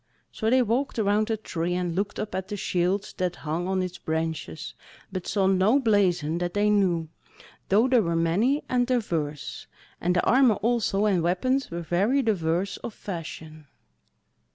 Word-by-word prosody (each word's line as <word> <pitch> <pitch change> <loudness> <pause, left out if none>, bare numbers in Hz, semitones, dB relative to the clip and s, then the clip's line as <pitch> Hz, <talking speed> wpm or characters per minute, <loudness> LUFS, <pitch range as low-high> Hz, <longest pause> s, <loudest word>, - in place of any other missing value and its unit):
So 220 - -1
they 255 +1 +4
walked 245 +5 -1
around 210 0 +2
the 225 - -1
Tree, 175 -4 -3
and 180 -2 -1
looked 200 +3 -2
up 215 - -4
at 190 0 -3
the 205 - -5
shields 185 +2 -1
that 180 -1 0
hung 165 +4 -2
on 190 -1 0
its 180 -1 -6
branches, 160 -2 -3 0.4
but 185 -2 -5
saw 195 0 +1
no 190 +6 +4
blazon 180 - +2
that 175 +1 -3
they 210 +1 +3
knew, 180 -6 +2 0.6
though 215 +6 +4
they 255 -2 +4
were 170 -5 0
many 200 - +2
and 245 -1 +1
diverse; 165 - -2 0.3
and 180 +1 +1
the 175 - +2
armour 255 -4 +5
also 215 -2 +1
and 195 -5 +2
weapons 255 +11 0
were 170 0 -4
very 200 - +1
diverse 190 -3 0
of 220 - -8
fashion. 160 -4 -8
190 Hz, 170 wpm, -26 LUFS, 170-220 Hz, 0.6 s, armour